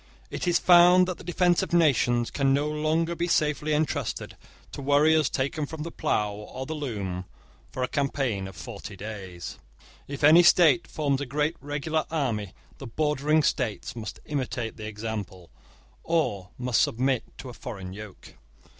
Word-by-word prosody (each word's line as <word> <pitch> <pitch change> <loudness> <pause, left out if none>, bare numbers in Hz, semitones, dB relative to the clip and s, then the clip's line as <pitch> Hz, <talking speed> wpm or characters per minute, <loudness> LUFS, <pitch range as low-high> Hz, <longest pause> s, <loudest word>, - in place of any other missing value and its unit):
It - - -4
is 175 -1 +4
found 180 +1 +6
that 185 - -4
the - - -10
defence 175 0 +2
of - - -4
nations 125 -7 +3
can 135 -1 +2
no 145 +2 0
longer 155 +2 0
be 170 +1 -2
safely 150 -2 +1
entrusted 150 +1 -1 0.4
to - - -7
warriors 145 +2 +4
taken 145 +3 -2
from 160 0 -6
the 170 - -6
plough 105 -8 -1
or 105 +5 -7
the 160 - -4
loom 100 - -4 0.4
for 130 - -4
a - - +1
campaign 135 -9 -1
of 95 - -11
forty 100 +5 -8
days. 95 -4 -8 0.5
If 140 0 -6
any 155 +4 +8
state 165 -7 +5
forms 145 -3 -1
a 145 - -4
great 150 +5 0
regular 150 +2 -2
army, 115 - -2 0.2
the 135 - -7
bordering 150 +4 +1
states 120 -6 -1
must 110 -2 -7
imitate 125 -5 -3
the 110 - -7
example, 105 -5 -6 0.5
or 105 - 0
must 125 -2 +1
submit 130 +1 +1
to 130 - -8
a - - -9
foreign 95 -7 -7
yoke. 105 -1 -11
140 Hz, 165 wpm, -26 LUFS, 110-155 Hz, 0.5 s, any